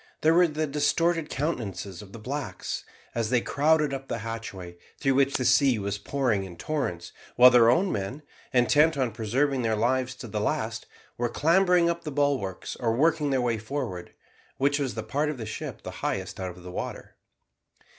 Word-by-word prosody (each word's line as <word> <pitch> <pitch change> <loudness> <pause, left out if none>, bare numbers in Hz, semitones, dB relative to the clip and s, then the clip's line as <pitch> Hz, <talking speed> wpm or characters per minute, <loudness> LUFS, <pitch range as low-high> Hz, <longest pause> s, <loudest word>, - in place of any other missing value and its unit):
There 160 +1 +5
were 175 +1 +5
the 155 0 -2
distorted 155 +3 +1
countenances 110 - -3
of 100 -2 -13
the 115 - -9
blacks, 135 +6 -5 0.3
as 115 -2 -1
they 125 0 +3
crowded 150 +3 +2
up 135 0 -5
the 115 - -2
hatchway, 95 -6 -6 0.2
through 135 -2 +2
which 140 +1 +2
the 130 - 0
sea 130 0 +4
was 100 0 -3
pouring 120 -4 0
in 90 -3 -9
torrents, 90 - -3 0.2
while 125 +1 +9
their 115 -2 +6
own 180 +10 +3
men, 105 +10 -4 0.3
intent 145 +5 +4
on 130 -3 0
preserving 125 +5 0
their 110 -2 +1
lives 130 +3 0
to 125 - -8
the 105 -1 -3
last, 110 +1 -2 0.3
were 120 0 0
clambering 175 +4 +3
up 170 0 -1
the 150 - -5
bulwarks 135 -10 -1
or 115 -2 0
working 155 +2 +2
their 135 -2 +1
way 120 -2 0
forward, 110 -6 -5 0.4
which 145 +2 +2
was 130 -6 -2
the 110 - -3
part 145 +8 -1
of 150 - -4
the 115 - -5
ship 110 - -6
the - - -6
highest - - -3
out 95 -1 -3
of 90 - -13
the 90 - -8
water. - - -6
130 Hz, 190 wpm, -27 LUFS, 110-145 Hz, 0.4 s, while